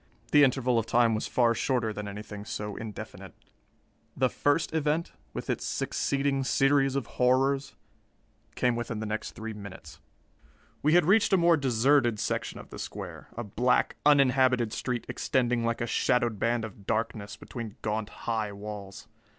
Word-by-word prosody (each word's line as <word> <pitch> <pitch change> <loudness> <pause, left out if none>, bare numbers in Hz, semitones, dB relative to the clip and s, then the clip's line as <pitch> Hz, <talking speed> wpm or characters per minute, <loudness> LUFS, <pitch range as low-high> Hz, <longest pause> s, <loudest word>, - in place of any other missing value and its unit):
The 145 -1 +7
interval 130 -3 +3
of 115 - -3
time 115 0 +4
was 110 - -2
far 120 -2 +3
shorter 115 -2 0
than 105 0 -5
anything 105 0 -7
so 105 -2 -5
indefinite. 110 -3 -8 0.8
The 130 -1 +3
first 145 +2 +1
event, 160 +1 0 0.2
with - - -6
its - - -1
succeeding 140 -1 0
series 135 0 +3
of 135 -4 -1 0.2
horrors, 135 +2 +2 0.8
came 125 -1 +2
within 115 -2 -3
the 110 - -3
next 110 +1 -4
three 110 0 -6
minutes. 95 -7 -10 0.8
We 155 +3 +3
had 175 - +5
reached 200 +3 +4
a - - +7
more 170 -1 +5
deserted 130 -3 +2
section - - -2
of - - -12
the - - -8
square, - - -7
a 120 - -2
black, 120 +4 +1
uninhabited 130 -5 +4
street 125 -2 -3
extending 125 -2 0
like 115 +1 -1
a - - +1
shadowed 120 -2 +1
band 115 -1 +1
of 100 -2 -12
darkness 110 -2 -2
between 115 -1 -7
gaunt, 110 0 -2 0.2
high 110 -3 -1
walls. 100 -1 -8
120 Hz, 160 wpm, -28 LUFS, 110-135 Hz, 0.8 s, The